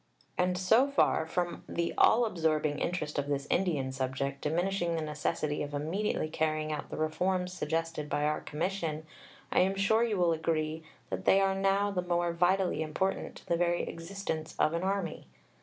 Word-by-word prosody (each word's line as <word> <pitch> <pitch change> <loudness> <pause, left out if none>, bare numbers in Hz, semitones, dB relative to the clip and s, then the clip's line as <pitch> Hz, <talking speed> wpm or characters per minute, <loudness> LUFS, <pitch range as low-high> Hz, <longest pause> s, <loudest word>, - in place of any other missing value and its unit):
And 180 0 +1
so 220 +9 +4
far 280 - +2
from 175 +1 -2
the 170 0 -1
all 235 +2 +5
absorbing 155 -6 0
interest 155 -5 -2
of 145 - -2
this 140 -1 -1
Indian 155 -8 +1
subject 135 +1 -2
diminishing 175 +2 0
the 165 - -1
necessity 150 0 -2
of 145 0 -4
immediately 160 +4 -1
carrying 155 0 -1
out 150 - -4
the - - -6
reforms 180 +4 0
suggested 165 -2 -2
by 145 - 0
our 150 +1 0
Commission, 160 -1 -3 0.5
I - - +3
am 190 +2 +3
sure 220 +4 +3
you 220 -4 0
will 175 -2 +3
agree 160 0 -1 0.3
that 95 0 -3
they 195 - +6
are 195 0 +3
now 195 +1 +2
the 185 -2 -1
more 175 -1 0
vitally 180 +2 +2
important 175 +5 -2
to - - -13
the 170 -2 +2
very 175 0 +1
existence 165 -2 -5
of 155 - +3
an 170 - -1
army. 190 - -2
170 Hz, 175 wpm, -31 LUFS, 155-190 Hz, 0.5 s, they